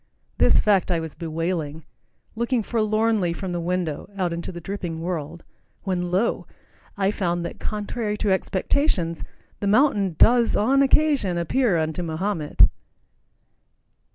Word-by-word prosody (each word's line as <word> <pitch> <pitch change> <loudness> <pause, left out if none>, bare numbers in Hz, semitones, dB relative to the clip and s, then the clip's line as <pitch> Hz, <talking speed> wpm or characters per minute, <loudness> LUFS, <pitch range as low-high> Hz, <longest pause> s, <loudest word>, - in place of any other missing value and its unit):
This - - +5
fact 200 -4 +2
I 170 -2 +1
was 160 -2 -5
bewailing, 160 -1 -3 0.5
looking 235 0 0
forlornly 215 -4 +1
from 185 +1 -5
the 175 - -2
window 170 -3 -2
out 180 -3 0
into 170 +2 -5
the 175 - -7
dripping 175 -2 -5
world, 165 -1 -4 0.4
when 180 -2 -2
lo, 190 +6 0 0.5
I 195 0 +2
found 175 -4 -1
that, - - -7
contrary 210 0 -3
to 205 - 0
expectations, 190 - 0 0.4
the 200 - -2
mountain 205 - +3
does 235 -1 +5
on 265 +6 +3
occasion 275 - +3
appear 190 +3 +1
unto 160 +2 -2
Mahomet! 165 -1 0
185 Hz, 130 wpm, -23 LUFS, 170-215 Hz, 0.5 s, This